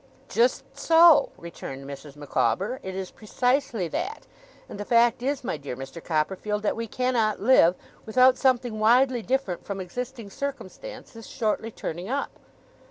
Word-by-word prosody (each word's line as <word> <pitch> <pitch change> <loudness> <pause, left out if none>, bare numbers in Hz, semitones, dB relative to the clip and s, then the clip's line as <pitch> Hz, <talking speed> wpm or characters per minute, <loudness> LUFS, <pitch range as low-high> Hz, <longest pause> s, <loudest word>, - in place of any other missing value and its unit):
'Just 485 +2 +2
so,' 330 -1 +6
returned 135 -5 -8
Mrs. 140 +1 -9
Micawber, 195 - -1
'It 190 0 -6
is 190 -1 -5
precisely 245 -3 -1
that. 430 - -4 0.4
And - - -9
the - - -3
fact 235 +2 +3
is, 275 +1 -2
my 255 - -2
dear 140 -3 -6
Mr. 135 +6 -9
Copperfield, 190 +6 -1
that 210 - 0
we 230 0 -4
can 255 +3 -1
not 215 -3 +1
live 200 -7 +5 0.3
without 255 +3 +5
something 245 -4 +1
widely 245 +3 +4
different 250 -7 -2
from 200 -1 -5
existing 230 +3 -6
circumstances 275 - -7
shortly 220 -1 -1
turning 180 -3 -6
up. 275 +2 -2
225 Hz, 150 wpm, -25 LUFS, 185-255 Hz, 0.4 s, so